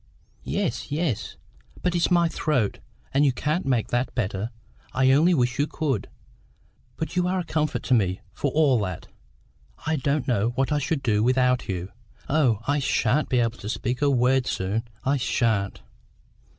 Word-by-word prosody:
"Yes, - - -2
yes. 150 - -2 0.5
But 180 - +1
it's 175 -1 +2
my 175 -2 +4
throat, 150 -9 0 0.3
and 140 +2 +4
you 140 - +4
can't 150 +6 -1
make 125 -5 +1
that 120 +2 -1
better; 105 -2 -2 0.4
I 130 0 +4
only 165 +6 +5
wish 125 -2 0
you 145 - +2
could. 135 -11 -2 0.9
But 160 - -4
you 180 0 +2
are 185 +1 0
a 180 - -1
comfort 155 -2 -1
to 130 - +1
me, 95 -6 +2
for 145 - -1
all 140 -4 +3
that; 90 -4 -4 0.8
I 160 0 +1
don't 140 +1 0
know 120 -1 +1
what 135 +1 0
I 150 - +2
should 145 0 -2
do 105 -4 +2
without 125 0 +2
you. 90 0 -3 0.4
Oh, 130 -8 +2
I 145 +1 +2
sha'n't 135 +1 +1
be 125 - +2
able 115 0 0
to 105 - -6
speak 125 +3 -2
a 145 - +4
word 130 0 +3
soon, 105 +5 -2 0.2
I 140 +2 +2
sha'n't!" 115 -6 0
130 Hz, 175 wpm, -25 LUFS, 115-150 Hz, 0.9 s, only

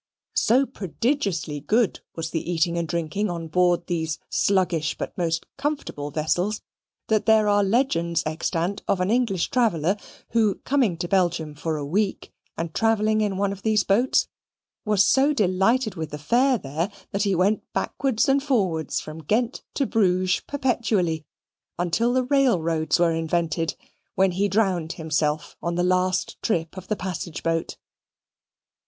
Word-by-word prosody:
So 260 +4 +3
prodigiously 195 - -2
good 220 - +1 0.2
was 160 -1 -4
the 170 +1 -2
eating 170 0 +1
and 170 -1 -1
drinking 170 +6 -1
on 170 -2 -4
board 175 +1 +2
these 160 -3 -2
sluggish 180 -6 +1
but - - -5
most 165 -2 -1
comfortable 275 - -3
vessels, 175 +8 -1 0.4
that 215 -1 +1
there 220 -1 +5
are 205 0 +4
legends 170 - +1
extant 165 +4 -2
of 190 - +1
an 185 +3 +1
English 225 -7 +1
traveller, 195 -8 +2 0.4
who, 215 -4 +3
coming 255 -11 +2
to 175 - -3
Belgium 175 -5 +1
for 155 +2 -3
a 145 - -4
week, 195 +6 -1 0.2
and 165 -1 -4
travelling 215 -1 +2
in 205 -3 0
one 200 0 +1
of 200 0 -7
these 215 -2 +2
boats, 235 +7 +2 0.6
was 210 -2 +4
so 275 +7 +4
delighted 215 +2 +2
with 160 -4 -5
the 150 - -6
fare 245 - +2
there 160 +4 -3 0.2
that 200 - -1
he 200 -2 +2
went 195 +5 +2
backwards 265 -2 0
and 275 +1 +3
forwards 195 - 0
from 155 +1 -8
Ghent 230 - 0
to 275 - +1
Bruges 185 -5 +2
perpetually 220 - 0 0.5
until 175 +8 +1
the 255 +1 +2
railroads 185 - +2
were 170 -1 +3
invented, 165 0 -1 0.4
when 190 0 +3
he 195 +3 +1
drowned 185 -5 0
himself 155 -1 -1
on 170 0 -2
the 175 - +1
last 185 0 0
trip 165 -7 -1
of 185 -1 -9
the 215 - 0
passage 180 -4 -5
boat. 165 0 -1
185 Hz, 155 wpm, -24 LUFS, 165-220 Hz, 0.6 s, there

